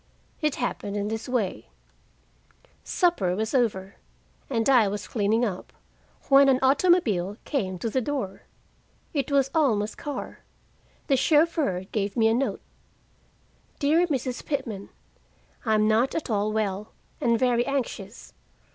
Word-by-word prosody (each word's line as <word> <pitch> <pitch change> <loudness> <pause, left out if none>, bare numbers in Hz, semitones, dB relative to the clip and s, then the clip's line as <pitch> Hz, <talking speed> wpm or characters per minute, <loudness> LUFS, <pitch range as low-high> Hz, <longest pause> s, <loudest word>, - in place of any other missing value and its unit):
It 300 -2 +1
happened 205 -4 -3
in 205 0 -2
this 220 +2 -4
way: 230 -7 -2 1.2
Supper 215 - +1
was 220 +2 -2
over, 200 -7 0 0.5
and 230 -4 0
I 250 -6 +5
was 205 +1 -4
cleaning 220 +2 +1
up, 190 -5 -5 0.6
when 275 0 +6
an 260 - +4
automobile 260 - +3
came 190 -11 -2
to 230 - -3
the 255 +4 0
door. 240 -7 -3 0.7
It 285 -1 -1
was 275 -1 +2
Alma's 220 -10 +2
car. 290 -2 -6 0.7
The 275 - +3
chauffeur 300 - +2
gave 205 +1 -2
me 225 -1 +4
a 225 - +3
note: 265 +4 -1 1.2
"DEAR 320 +5 +3
MRS 255 -4 -2
PITMAN 235 -9 -4 0.8
I 220 - +4
am 215 0 +3
not 225 +4 +2
at 315 -6 -3
all 210 0 +1
well, 210 -1 -2 0.3
and 235 -1 +3
very 245 0 +2
anxious. 240 -7 -4
235 Hz, 135 wpm, -26 LUFS, 205-275 Hz, 1.2 s, when